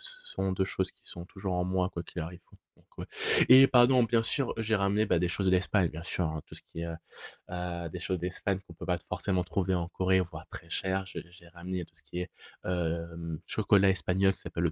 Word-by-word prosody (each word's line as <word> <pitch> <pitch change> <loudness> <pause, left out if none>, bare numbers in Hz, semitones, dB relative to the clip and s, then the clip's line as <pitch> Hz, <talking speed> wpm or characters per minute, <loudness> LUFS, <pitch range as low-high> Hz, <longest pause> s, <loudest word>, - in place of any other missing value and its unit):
ce - - -7
sont 95 - -2
2 95 0 +1
choses 95 0 -2
qui - - -33
sont 85 0 -8
toujours 95 -1 -4
en 90 - +1
moi 95 0 0
quoi 85 - -4
qu'il 90 - -7
arrive, 85 +3 -7
quoi, - - -21 0.2
donc - - -27
ouais - - -4 0.4
et 130 +2 +10
pardon, 125 0 +6
bien 115 0 +2
sûr, 135 +2 +1
j'ai 110 0 +1
ramené, 100 +2 +2
bah, 85 - +3
des 90 - +1
choses 95 +3 0
de 95 - +4
l'Espagne, 95 0 +3
bien 80 +2 -7
sûr, 90 +1 -1
hein, 80 -1 -4
tout - - -12
ce - - -8
qui 85 - -9
est, 85 - -3
heu 85 -1 -5 0.6
heu, 90 -1 -4
des 90 - -6
choses 90 0 -2
d'Espagne 90 +2 -1
qu'on 85 - -11
peut - - -8
pas 90 -1 +1
t 85 - -22
forcément 90 0 0
trouver 90 +2 0
en 85 -1 -1
Corée, 95 0 +2
voire 85 - -7
très 85 - -10
chères. 95 +3 0
J'ai - - -6
j'ai 90 -1 -16
ramené 90 +1 -5
tout - - -29
ce - - -17
qui 90 - -6
est, 90 0 -4 0.4
hem, 85 -2 -2
chocolat 100 -1 +4
espagnol 95 +1 +2
qui - - -15
s'appelle 85 - -3
le 85 - +2
90 Hz, 255 wpm, -30 LUFS, 85-95 Hz, 0.6 s, et